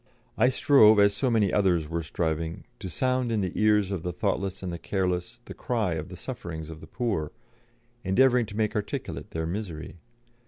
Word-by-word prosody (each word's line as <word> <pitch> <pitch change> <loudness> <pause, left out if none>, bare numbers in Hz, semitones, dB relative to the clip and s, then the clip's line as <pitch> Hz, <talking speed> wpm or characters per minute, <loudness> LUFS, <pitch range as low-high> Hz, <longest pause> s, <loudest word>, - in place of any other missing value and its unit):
I 125 +3 +4
strove, 120 -5 +6
as 100 0 +5
so 130 +5 +1
many 110 -5 +2
others 90 -6 +2
were 85 +1 -2
striving, 80 0 -3 0.2
to 95 - -6
sound 130 +5 0
in 110 -2 +1
the 95 -2 -1
ears 105 -2 +3
of 95 -4 -2
the 90 - -3
thoughtless 95 0 -2
and 90 -2 -3
the 85 - -5
careless 95 +4 -2
the - - -8
cry 110 -8 -1
of 80 +2 -5
the 90 - -8
sufferings 85 - -6
of 80 -1 -10
the - - -11
poor, 100 -11 -2 0.7
endeavouring 125 +4 +3
to 105 0 -8
make 110 0 0
articulate 105 - -4
their 80 0 -3
misery. 85 -3 -5
95 Hz, 190 wpm, -27 LUFS, 85-110 Hz, 0.7 s, strove